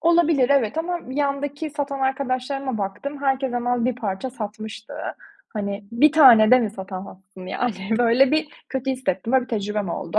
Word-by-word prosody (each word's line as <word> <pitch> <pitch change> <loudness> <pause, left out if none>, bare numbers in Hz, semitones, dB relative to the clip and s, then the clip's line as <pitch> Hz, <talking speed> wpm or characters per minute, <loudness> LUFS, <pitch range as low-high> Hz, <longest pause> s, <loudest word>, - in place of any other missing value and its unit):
Olabilir, 330 -6 +3
evet 275 0 +2
ama 350 +2 -1
yandaki 285 +2 -2
satan 280 -1 -4
arkadaşlarıma 265 -1 -2
baktım, 275 +9 -5
herkes 270 -1 0
hemen 245 0 0
1 250 -1 +1
parça 215 +1 -4
satmıştı. 215 -2 -7 0.5
Hani, 200 -1 -4
1 295 +6 +5
tane 240 -8 +8
de 255 - +8
mi 220 -4 -1
satamazsın, 190 -1 -9
yani? 215 +1 -2
Böyle, 245 +3 +4
bir 310 0 +1 0.2
kötü 265 0 -2
hissettim 250 -4 -2
ve 265 - +5
bir 245 - -11
tecrübem 210 -2 -2
oldu. 170 +4 -2
250 Hz, 160 wpm, -23 LUFS, 210-275 Hz, 0.5 s, tane